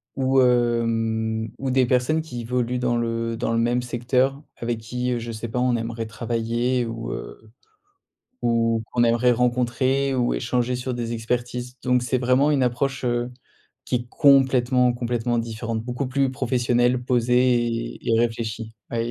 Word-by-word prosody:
ou, 135 0 +3
hem, 115 -2 +1
ou 135 - -3
des 130 0 +3
personnes 125 +6 +1
qui 125 -7 -7
évoluent 125 +1 -1
dans 125 -1 +1
le 115 0 -1
dans 115 0 -2
le 115 - +1
même 120 +1 +1
secteur, 125 +3 0 0.2
avec 120 -1 -3
qui, 125 +3 -3
heu, 120 - 0
je 115 0 -6
sais 110 +1 -5
pas, 125 - -2
on 125 -1 +2
aimerait 115 0 -3
travailler 120 +2 -1
ou, 115 0 -5
heu, 110 -1 -8 0.9
ou 115 -1 +1
qu'on 120 - +2
aimerait 120 +1 +3
rencontrer 125 +3 +1
ou 125 -1 +1
échanger 125 - -1
sur 125 +1 -3
des 120 -1 -3
expertises. 120 +2 -3
Donc 125 -1 +2
c'est 130 +1 0
vraiment 130 +4 +3
une 140 -3 +2
approche, 130 +2 -1
heu, 120 0 -1 0.5
qui - - -3
est 120 0 -5
complètement, 130 -3 +4
complètement 120 0 -1
différente. 115 0 -3
Beaucoup 125 +3 -3
plus 135 +1 +1
professionnelle, 125 -1 +1
posée 125 0 +2 0.3
et - - -4
et - - +3
réfléchie. 115 -1 -2 0.2
Ouais, 115 0 -2
120 Hz, 165 wpm, -23 LUFS, 115-125 Hz, 0.9 s, complètement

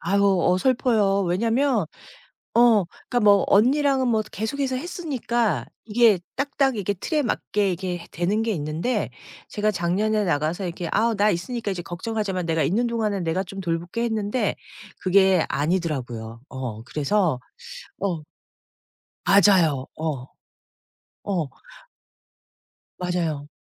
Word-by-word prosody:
아유 200 +3 +1 0.2
어설퍼요. 205 -1 +2
왜냐면 225 - +1 0.7
어 230 -5 +5 0.2
그니까 245 - +2
뭐 200 -1 +6
언니랑은 265 +4 +3
뭐 220 -2 +2
계속해서 260 +5 -2
했으니까 255 - -1 0.2
이게 225 -3 +4 0.2
딱딱 275 -1 +1
이게 205 -1 -1
틀에 300 - -1
맞게 205 -5 0
이게 175 -1 -4
되는 185 +6 0
게 225 0 0
있는데 160 +10 -2 0.4
제가 210 0 0
작년에 205 +4 0
나가서 160 +3 0
이렇게 170 -1 -4
"아 230 +1 +2
나 205 +1 +3
있으니까 210 +5 -2
이제 180 -2 -4
걱정하지 205 +4 -3
마. 185 - -1
내가 165 -1 +1
있는 235 +7 +1
동안에 220 -4 -1
내가 170 +3 -1
좀 195 +1 -7
돌볼게." 170 +5 -2
했는데 220 -1 -1 0.4
그게 190 -2 +4
아니더라고요. 135 -8 -2
어 125 -5 -6
그래서 155 - 0 0.6
어. 170 -6 -2 1.0
맞아요. 180 -9 +4
어. 150 -5 -3 1.0
어. 175 -8 -1 1.5
맞아요. 165 -5 -2
195 Hz, 270 characters per minute, -24 LUFS, 170-230 Hz, 1.5 s, 뭐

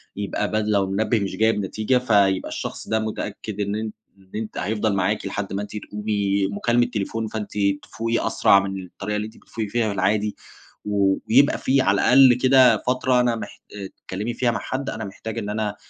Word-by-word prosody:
يبقى 100 -1 -2
بدل 110 0 0
لو 100 -2 +3
المنبِّه 105 +4 0
مش 100 -2 -3
جايب 110 0 +3
نتيجة 110 +6 0
فيبقى 100 -6 +2
الشخص - - -6
ده 110 0 +1
متأكد 105 -1 -5
إن 100 +1 -1
أن 110 0 -3 0.3
إن 95 -1 -24
أنتِ 110 0 -5
حيفضل 105 +2 0
معاكِ 100 +3 0
لحد 100 0 -4
ما 100 - -2
أنتِ 105 - -7
تقومي، 100 -2 -1
مكالمة 120 +4 +1
تليفون 110 +1 -2
فأنتِ 105 -1 -5 0.3
تفوقي 115 +1 -2
أسرع 100 - +5
من 95 -1 -4
الطريقة 100 +3 -5
اللي 105 0 -2
أنتِ 110 +1 -11
بتفوقي 110 -2 -6
فيها 115 +1 0
في 100 - -1
العادي. 105 +2 0 0.5
ويبقى 105 +7 +3
في 135 +1 +2
على 100 -5 +3
الأقل 130 0 +7
كده 130 0 +5
فترة 125 0 +1
أنا 120 -1 +2
محت 105 -2 -8
آآ، 100 -2 -6
تتكلمي 105 +7 -6
فيها 120 0 +1
مع 115 - -2
حد 135 +1 -4
أنا 110 - -5
محتاجة 105 +3 -6
إن 105 - -5
أنا 105 -1 -2
105 Hz, 195 wpm, -23 LUFS, 100-115 Hz, 0.5 s, الأقل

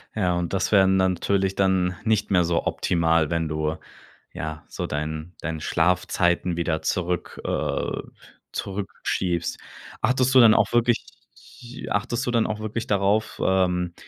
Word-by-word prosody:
Ja, 90 -5 +1
und 85 0 -3
das 95 -1 0
wären 95 -2 +5
natürlich 95 +1 +1
dann 95 -2 +2
nicht 110 -2 +1
mehr 90 -2 +4
so 85 0 0
optimal, 80 -2 +1
wenn 85 -1 0
du 75 0 -1 0.6
ja 80 0 -5
so - - -5
deinen 80 +3 -4
deinen 80 -2 -4
Schlafzeiten 85 +1 +1
wieder 80 -2 -1
zurück 90 -1 -2
äh, - - -2 0.5
zurückschiebst. 95 -3 -3 0.4
Achtest 130 +2 +2
du 130 - +8
dann 115 -3 +8
auch - - +2
wirklich 120 0 +2 0.8
achtest 120 +4 -1
du 125 - -1
dann 115 -2 +2
auch 110 0 -3
wirklich 110 +1 -4
darauf, 100 +2 +1
ähm, 90 -2 +1
90 Hz, 140 wpm, -24 LUFS, 85-105 Hz, 0.8 s, du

